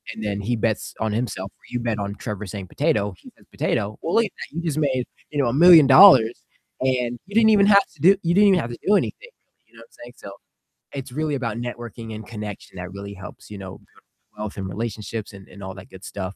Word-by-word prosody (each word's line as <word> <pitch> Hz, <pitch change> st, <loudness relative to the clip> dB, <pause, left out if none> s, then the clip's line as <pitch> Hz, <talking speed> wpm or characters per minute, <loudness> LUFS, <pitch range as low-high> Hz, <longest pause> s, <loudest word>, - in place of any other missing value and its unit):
and 110 Hz, -, -7 dB
then 100 Hz, -1 st, -2 dB
he 120 Hz, +4 st, -1 dB
bets 110 Hz, -1 st, -2 dB
on 110 Hz, -1 st, -1 dB
himself 105 Hz, -4 st, -3 dB
where -, -, -25 dB
you 125 Hz, -, -2 dB
bet 115 Hz, -3 st, -2 dB
on 100 Hz, 0 st, -4 dB
Trevor 105 Hz, -1 st, -6 dB
saying 95 Hz, -1 st, -7 dB
"potato". 105 Hz, -, 0 dB
He -, -, -15 dB
says -, -, -23 dB
"potato." 105 Hz, +1 st, -2 dB
Well, 165 Hz, -, -2 dB
look 230 Hz, -, +4 dB
at 205 Hz, -, -7 dB, 0.2 s
that. -, -, -18 dB
You -, -, -1 dB
just 155 Hz, -3 st, -2 dB
made, 130 Hz, -4 st, 0 dB, 0.3 s
you 145 Hz, -, -2 dB
know, 130 Hz, -, +1 dB
$1,000,000 135 Hz, -6 st, +7 dB, 0.4 s
and 125 Hz, -2 st, 0 dB
you 200 Hz, -, -10 dB
didn't 225 Hz, -1 st, +6 dB
even 200 Hz, -1 st, +5 dB
have 200 Hz, -1 st, +6 dB
to -, -, -18 dB
do 190 Hz, +3 st, +6 dB
you 170 Hz, -, +1 dB
didn't 205 Hz, +1 st, +6 dB
even 185 Hz, -2 st, +4 dB
have 120 Hz, -, -5 dB
to 120 Hz, -, -7 dB
do 205 Hz, -, +5 dB
anything, -, -, -4 dB, 0.4 s
you -, -, -27 dB
know -, -, -15 dB
what -, -, -14 dB
I'm -, -, -31 dB
saying? -, -, -12 dB
So -, -, -10 dB, 0.6 s
it's 135 Hz, -2 st, -6 dB
really 150 Hz, +2 st, -2 dB
about 115 Hz, -5 st, -3 dB
networking 120 Hz, -2 st, -7 dB
and 110 Hz, 0 st, -9 dB
connection 105 Hz, -4 st, -8 dB
that 90 Hz, 0 st, -7 dB
really 100 Hz, 0 st, -8 dB
helps, 100 Hz, +2 st, -12 dB
you 105 Hz, -, -7 dB
know, 95 Hz, -1 st, -8 dB
build -, -, -26 dB, 0.3 s
wealth 105 Hz, -1 st, -6 dB
and 95 Hz, -1 st, -4 dB
relationships 110 Hz, +1 st, -5 dB
and 100 Hz, -1 st, -13 dB
and 100 Hz, -, -13 dB
all 95 Hz, 0 st, -7 dB
that 95 Hz, 0 st, -12 dB
good 95 Hz, 0 st, -14 dB
stuff. 95 Hz, -1 st, -6 dB
115 Hz, 245 wpm, -23 LUFS, 100-145 Hz, 0.6 s, $1,000,000